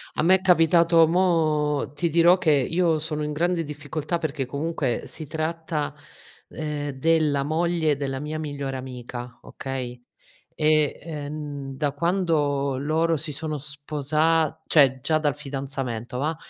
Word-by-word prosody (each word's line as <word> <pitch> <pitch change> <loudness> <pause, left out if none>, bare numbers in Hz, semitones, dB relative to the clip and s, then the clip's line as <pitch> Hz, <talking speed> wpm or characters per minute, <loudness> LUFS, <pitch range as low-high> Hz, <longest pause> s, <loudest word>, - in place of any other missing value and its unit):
A - - 0
me 185 +3 +6
è - - -16
capitato. 170 -2 +5
Mo 155 -5 +1
ti 170 +3 -1
dirò 170 +3 +5
che 180 -4 +2
io 160 +4 +2
sono 150 -1 -3
in 150 0 -3
grande 170 +2 0
difficoltà 150 +2 -3
perché 150 -4 -3
comunque 140 -1 -2
si 155 - -8
tratta, 160 -1 -3 0.6
ehm, 150 -2 -4
della 150 0 +2
moglie 160 -1 +1
della 135 -2 -3
mia 155 +2 -4
migliore 140 -3 -4
amica, 125 -1 -7
okay, 125 -2 -6 0.5
e, 155 -1 +2
ehm, 145 -3 -6
da 145 +1 0
quando 150 -5 +1
loro 160 +4 +1
si 155 +1 -4
sono 155 +1 -3
sposa 150 +2 0
cioè 135 -4 +4
già 155 +3 +1
dal 145 -2 0
fidanzamento, 135 -4 -5
va'. 155 +4 0
150 Hz, 140 wpm, -24 LUFS, 140-165 Hz, 0.6 s, me